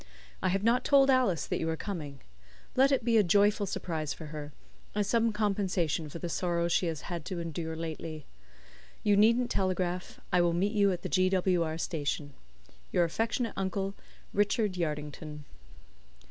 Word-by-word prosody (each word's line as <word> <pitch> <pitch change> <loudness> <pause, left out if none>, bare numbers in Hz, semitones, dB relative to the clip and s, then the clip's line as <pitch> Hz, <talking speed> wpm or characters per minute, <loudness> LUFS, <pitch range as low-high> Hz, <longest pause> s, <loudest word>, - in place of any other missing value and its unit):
I - - +1
have 195 +2 0
not 240 +3 +3
told 275 -1 +5
Alice 240 - +2
that - - -2
you 165 - -1
are 160 - -1
coming. 150 -10 -6 0.5
Let 270 +2 +5
it 255 -4 +1
be 230 -1 +4
a 215 - +6
joyful 205 +3 +3
surprise 160 -5 -3
for 160 - -9
her, 150 -1 -6 0.4
as 210 -1 +1
some 230 +3 +2
compensation 190 -7 0
for 155 - -7
the 175 - -4
sorrows 170 0 0
she 180 - +2
has 160 -2 -3
had 170 -3 -5
to 185 -2 -4
endure 165 -1 -4
lately. 160 -2 -5 0.8
You 205 -1 +4
needn't 235 +4 +4
telegraph. 185 -1 -1
I 180 - +5
will 170 -1 +2
meet 190 +4 +1
you 200 -2 +4
at 175 -1 -4
the - - -3
G. 185 0 +3
W. 185 -2 +2
R. 160 -1 -1
station. 145 -3 -3 0.6
"Your 175 - +3
affectionate 225 +6 -1
uncle, 195 +1 -2 0.4
"RICHARD 205 -1 +1
YARDINGTON." 150 -2 -4
180 Hz, 175 wpm, -30 LUFS, 160-205 Hz, 0.8 s, a